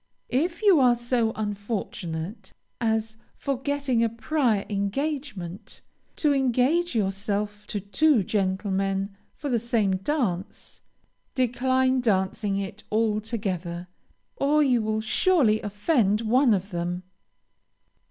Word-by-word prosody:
If 335 Hz, -, -1 dB
you 390 Hz, -7 st, +6 dB
are 250 Hz, -2 st, +5 dB
so 240 Hz, -1 st, 0 dB
unfortunate 205 Hz, -4 st, -4 dB, 0.3 s
as, 220 Hz, -1 st, 0 dB, 0.2 s
forgetting 275 Hz, -2 st, 0 dB
a 230 Hz, -, +2 dB
prior 230 Hz, -2 st, 0 dB
engagement, 205 Hz, -, -3 dB, 0.3 s
to 300 Hz, -2 st, +2 dB
engage 270 Hz, +5 st, +2 dB
yourself 205 Hz, 0 st, -2 dB
to 205 Hz, -, -2 dB
two 225 Hz, +5 st, +3 dB
gentlemen 195 Hz, 0 st, -1 dB, 0.2 s
for 295 Hz, -, -6 dB
the 245 Hz, -4 st, +1 dB
same 220 Hz, -5 st, +1 dB
dance, 200 Hz, -, -3 dB, 0.5 s
decline 260 Hz, +1 st, +2 dB
dancing 195 Hz, -2 st, 0 dB
it 195 Hz, +1 st, -5 dB
altogether, 210 Hz, -5 st, -1 dB, 0.5 s
or 300 Hz, +2 st, +3 dB
you 250 Hz, -4 st, +3 dB
will 215 Hz, 0 st, -1 dB
surely 220 Hz, -2 st, +3 dB
offend 210 Hz, -, +1 dB
one 235 Hz, +1 st, +4 dB
of 195 Hz, +2 st, -4 dB
them. 175 Hz, +1 st, -3 dB
220 Hz, 105 wpm, -26 LUFS, 195-260 Hz, 0.5 s, you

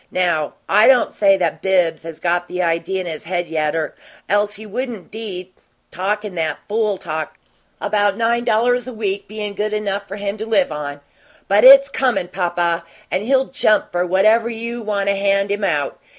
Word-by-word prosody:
Now, 170 Hz, -5 st, 0 dB
I 210 Hz, +2 st, +5 dB
don't 260 Hz, -2 st, +4 dB
say 195 Hz, -2 st, +4 dB
that 170 Hz, -4 st, -1 dB
Bibbs 180 Hz, -4 st, +1 dB
has 165 Hz, -1 st, -9 dB
got 175 Hz, 0 st, 0 dB
the 180 Hz, -, -5 dB
idea 170 Hz, +2 st, 0 dB
in -, -, -6 dB
his 160 Hz, -2 st, -6 dB
head 175 Hz, 0 st, -2 dB
yet 155 Hz, -1 st, -1 dB
'r 155 Hz, -2 st, -2 dB, 0.3 s
else 205 Hz, +1 st, +1 dB
he 215 Hz, +1 st, -10 dB
wouldn't 225 Hz, -2 st, -5 dB
be 190 Hz, -5 st, -7 dB, 0.4 s
talkin' 205 Hz, +2 st, -2 dB
that 160 Hz, -2 st, -2 dB
fool 210 Hz, -2 st, 0 dB
talk 160 Hz, -4 st, -5 dB, 0.4 s
about 205 Hz, -1 st, +1 dB
nine 235 Hz, +1 st, +1 dB
dollars 245 Hz, +2 st, +1 dB
a 255 Hz, -, -6 dB
week 200 Hz, -3 st, -3 dB
bein' 210 Hz, -1 st, -5 dB
good 210 Hz, +2 st, -2 dB
enough 200 Hz, -1 st, -2 dB
for 195 Hz, -, -6 dB
him 200 Hz, 0 st, -4 dB
to 220 Hz, -, -4 dB
live 200 Hz, -7 st, +2 dB
on. 145 Hz, -1 st, -5 dB, 0.5 s
But 200 Hz, +2 st, +3 dB
it's 275 Hz, +1 st, +9 dB
COMIN', 250 Hz, -10 st, 0 dB
papa, 175 Hz, -2 st, -1 dB, 0.3 s
and 185 Hz, -, 0 dB
he'll 265 Hz, +4 st, +2 dB
JUMP 215 Hz, -6 st, +1 dB
for 175 Hz, 0 st, 0 dB
whatever 215 Hz, +6 st, +3 dB
you 235 Hz, +1 st, -5 dB
want 205 Hz, -2 st, -2 dB
to 200 Hz, -, +2 dB
hand 200 Hz, 0 st, +1 dB
him 205 Hz, 0 st, -2 dB
out. 150 Hz, -7 st, -1 dB
200 Hz, 190 wpm, -19 LUFS, 175-215 Hz, 0.5 s, it's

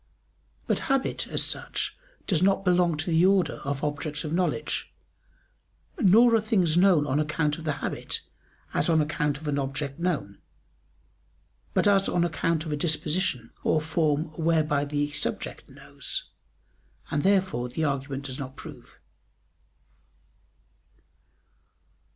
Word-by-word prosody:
But -, -, 0 dB
habit 270 Hz, -1 st, 0 dB
as -, -, +1 dB
such -, -, -3 dB, 0.3 s
does 175 Hz, -4 st, +1 dB
not 195 Hz, +1 st, +2 dB
belong 175 Hz, -3 st, +3 dB
to 160 Hz, +3 st, -1 dB
the 165 Hz, +1 st, +4 dB
order 190 Hz, -1 st, +3 dB
of 140 Hz, +1 st, -4 dB
objects 150 Hz, 0 st, -2 dB
of 155 Hz, -1 st, -4 dB
knowledge; 170 Hz, -4 st, -1 dB, 1.1 s
nor 230 Hz, +2 st, +6 dB
are 225 Hz, -, +4 dB
things 190 Hz, -7 st, +2 dB
known 175 Hz, -4 st, +5 dB
on 140 Hz, +1 st, 0 dB
account 150 Hz, 0 st, 0 dB
of 160 Hz, -, -9 dB
the 155 Hz, -, +1 dB
habit, -, -, -3 dB, 0.5 s
as -, -, +1 dB
on 160 Hz, -1 st, +4 dB
account 150 Hz, -1 st, 0 dB
of 155 Hz, +1 st, -9 dB
an 145 Hz, -1 st, 0 dB
object 140 Hz, +1 st, -3 dB
known, 150 Hz, -, -2 dB, 1.4 s
but -, -, +3 dB
as 195 Hz, -1 st, +4 dB
on 175 Hz, -, +2 dB
account 165 Hz, 0 st, 0 dB
of 155 Hz, -, -4 dB
a -, -, +1 dB
disposition 150 Hz, -5 st, -1 dB
or 155 Hz, -, +3 dB
form 155 Hz, 0 st, 0 dB
whereby 155 Hz, -3 st, +2 dB
the 145 Hz, 0 st, -1 dB
subject 150 Hz, 0 st, -4 dB
knows: -, -, -6 dB, 0.8 s
and 145 Hz, -, +1 dB
therefore 190 Hz, -11 st, +1 dB
the 160 Hz, +6 st, -3 dB
argument 140 Hz, -1 st, -2 dB
does 130 Hz, -2 st, -5 dB
not 135 Hz, -1 st, -6 dB
prove. 140 Hz, -7 st, -12 dB
155 Hz, 135 wpm, -27 LUFS, 145-175 Hz, 1.4 s, nor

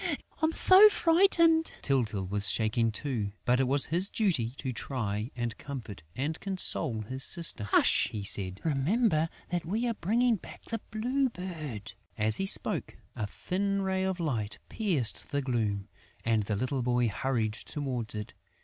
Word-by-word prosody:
I'm 315 Hz, 0 st, +2 dB
so 380 Hz, +5 st, +7 dB
frightened!" 330 Hz, -3 st, +3 dB
Tyltyl 110 Hz, -8 st, 0 dB
was 105 Hz, +1 st, +3 dB
shaking 115 Hz, +1 st, +1 dB
too, 110 Hz, -5 st, -3 dB
but 125 Hz, +1 st, +3 dB
it 135 Hz, -, +2 dB
was 135 Hz, +1 st, +4 dB
his 180 Hz, +5 st, 0 dB
duty 175 Hz, -, 0 dB
to 130 Hz, -2 st, -4 dB
try 110 Hz, -3 st, -3 dB
and 120 Hz, -2 st, -3 dB
comfort 125 Hz, -, -7 dB
and 150 Hz, +5 st, -3 dB
console 165 Hz, -, 0 dB
his 130 Hz, +5 st, -4 dB
sister: 165 Hz, -, +1 dB
"Hush!" 100 Hz, -, +3 dB
he 105 Hz, -2 st, -5 dB
said. 95 Hz, -1 st, +2 dB
"Remember 160 Hz, -, +1 dB, 0.2 s
that 175 Hz, -1 st, -1 dB
we 215 Hz, +8 st, -2 dB
are 235 Hz, -, 0 dB
bringing 230 Hz, +4 st, +1 dB
back -, -, -13 dB
the 225 Hz, -2 st, -5 dB
Blue 255 Hz, +5 st, 0 dB
Bird!" 155 Hz, -, -7 dB, 0.2 s
As 110 Hz, 0 st, +3 dB
he 195 Hz, -, -1 dB
spoke, -, -, +5 dB, 0.2 s
a 105 Hz, -, -3 dB
thin 195 Hz, -, -2 dB
ray 190 Hz, 0 st, -1 dB
of 190 Hz, -1 st, -2 dB
light 115 Hz, -11 st, -2 dB
pierced 170 Hz, -, -2 dB
the 145 Hz, -, -1 dB
gloom; 110 Hz, -6 st, -1 dB, 0.4 s
and 115 Hz, -1 st, +2 dB
the 105 Hz, 0 st, -2 dB
little 130 Hz, +5 st, -2 dB
boy 125 Hz, 0 st, +1 dB
hurried 110 Hz, 0 st, -1 dB
towards 125 Hz, -3 st, -3 dB
it. 105 Hz, 0 st, -6 dB
135 Hz, 160 wpm, -29 LUFS, -, 0.4 s, so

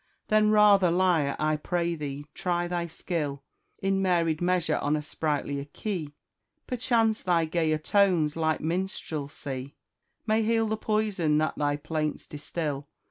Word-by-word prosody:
Then 215 Hz, 0 st, +4 dB
rather, 205 Hz, -3 st, +6 dB
lyre, 170 Hz, -5 st, +2 dB
I 155 Hz, 0 st, +1 dB
pray 170 Hz, +2 st, -1 dB
thee, 145 Hz, -2 st, -5 dB
try 175 Hz, -1 st, -1 dB
thy 175 Hz, -1 st, -2 dB
skill, 150 Hz, -4 st, -3 dB, 0.4 s
In 195 Hz, 0 st, +1 dB
varied 170 Hz, -4 st, +1 dB
measure, 175 Hz, -3 st, +1 dB
on 145 Hz, +1 st, +1 dB
a 150 Hz, -, -1 dB
sprightlier 145 Hz, -2 st, -2 dB
key: 170 Hz, -9 st, -4 dB, 0.5 s
Perchance 230 Hz, -3 st, +1 dB
thy 170 Hz, -3 st, +2 dB
gayer 160 Hz, -1 st, +1 dB
tones' 175 Hz, -3 st, +2 dB
light 160 Hz, -1 st, 0 dB
minstrelsy 145 Hz, -6 st, -4 dB, 0.5 s
May 220 Hz, 0 st, +2 dB
heal 225 Hz, 0 st, +2 dB
the 220 Hz, -, 0 dB
poison 210 Hz, -8 st, +1 dB
that 155 Hz, 0 st, 0 dB
thy 145 Hz, -1 st, 0 dB
plaints 155 Hz, 0 st, -3 dB
distil. 145 Hz, -1 st, -4 dB
165 Hz, 135 wpm, -27 LUFS, 150-195 Hz, 0.5 s, rather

